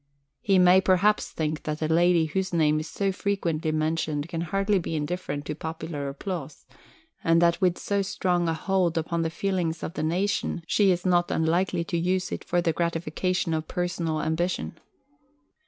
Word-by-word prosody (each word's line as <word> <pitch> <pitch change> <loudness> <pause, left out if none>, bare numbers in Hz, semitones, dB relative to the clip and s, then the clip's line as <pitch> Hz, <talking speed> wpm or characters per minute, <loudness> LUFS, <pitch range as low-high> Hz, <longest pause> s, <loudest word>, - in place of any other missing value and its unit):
He 195 -2 +2
may 180 +1 +6
perhaps 190 +3 +3
think 155 -1 -3
that 150 0 -4
a 155 - 0
lady 170 +1 +4
whose 185 +4 -2
name 155 -2 +3
is 155 +1 -6
so 195 -1 -1
frequently 170 -5 -1
mentioned 155 -1 -1
can 165 -2 -3
hardly 195 +4 +1
be 165 -1 -4
indifferent 150 -2 -3
to 150 - -3
popular 160 -2 -5
applause 155 +1 -6 0.6
and 165 0 +4
that 170 +2 +3
with 180 -2 +2
so 200 -1 -1
strong 180 -3 0
a 165 - 0
hold 180 -1 0
upon 165 +1 -1
the 165 - 0
feelings 170 -2 -2
of 160 - -4
the 150 - -4
nation, 175 +1 -1
she 200 +2 +3
is 180 0 +1
not 175 -1 +3
unlikely 170 +2 +1
to 170 0 -2
use 185 +2 0
it - - -4
for 175 0 0
the 165 - +1
gratification 170 +1 -1
of 155 0 -2
personal 170 -3 -2
ambition. 165 +3 -1
170 Hz, 175 wpm, -26 LUFS, 160-185 Hz, 0.6 s, may